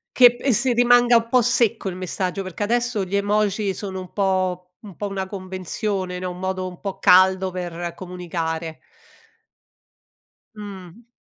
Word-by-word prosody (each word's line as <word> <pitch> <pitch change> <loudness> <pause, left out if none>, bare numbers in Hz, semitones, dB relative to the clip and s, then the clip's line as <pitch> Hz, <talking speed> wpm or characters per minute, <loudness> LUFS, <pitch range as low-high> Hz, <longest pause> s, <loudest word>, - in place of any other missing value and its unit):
Che 245 -1 +7
p - - -15
e 275 - +2
si 240 +3 +2
rimanga 245 0 +5
un 230 - -1
po' 250 +1 +4
secco 225 -4 +1
il 180 - -6
messaggio, 185 +1 -3
perché 185 +2 -5
adesso 240 -1 0
gli 190 +1 -3
emoji 205 0 +1
sono 190 -2 -5
un 185 - -9
po 185 -2 0 0.2
un 200 -5 -12
po' 205 - -4
una 195 -1 -4
convenzione, 185 0 -4
no, 185 0 -3
un 180 - -9
modo 185 0 -2
un 180 -1 -10
po' 195 -1 -5
caldo 185 +1 +5
per 175 -1 -5
comunicare. 170 -3 -5 1.8
Mhmm. 200 +1 -10
190 Hz, 160 wpm, -22 LUFS, 180-210 Hz, 1.8 s, Che